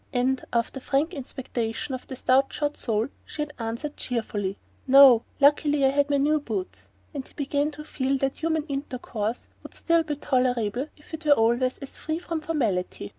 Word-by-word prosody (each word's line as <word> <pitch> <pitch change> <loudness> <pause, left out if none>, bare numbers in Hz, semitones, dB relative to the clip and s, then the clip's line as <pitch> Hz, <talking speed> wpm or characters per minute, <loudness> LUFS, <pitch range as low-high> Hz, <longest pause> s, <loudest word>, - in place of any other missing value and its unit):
and, 255 +1 +1
after 235 +3 0
frank 280 +6 0
inspection 250 -3 -4
of 255 - -6
a 260 - -5
stout 260 +2 +3
shod 295 0 -1
sole, 225 0 -1 0.2
she 300 - -4
had 295 0 -8
answered 235 +6 -4
cheerfully: 205 -5 -2 0.3
"No 265 -3 +9 0.2
luckily 290 0 +4
I - - +6
had 285 +1 +2
on - - -21
my - - +4
new 300 +2 +3
boots," 210 -9 -4 0.2
he 285 - -3
began 285 +1 0
to 300 0 -8
feel 270 -2 -1
that 270 0 -1
human 320 -1 0
intercourse 255 -6 -4
would - - -11
still 335 -1 +3
be 305 -2 -3
tolerable 250 -2 0
if 295 - -19
it 320 +1 -5
were 290 - +8
always 240 +1 +2
as 275 - -8
free 315 0 -2
from 335 -2 -4
formality. 220 - -1
270 Hz, 180 wpm, -26 LUFS, 240-295 Hz, 0.3 s, No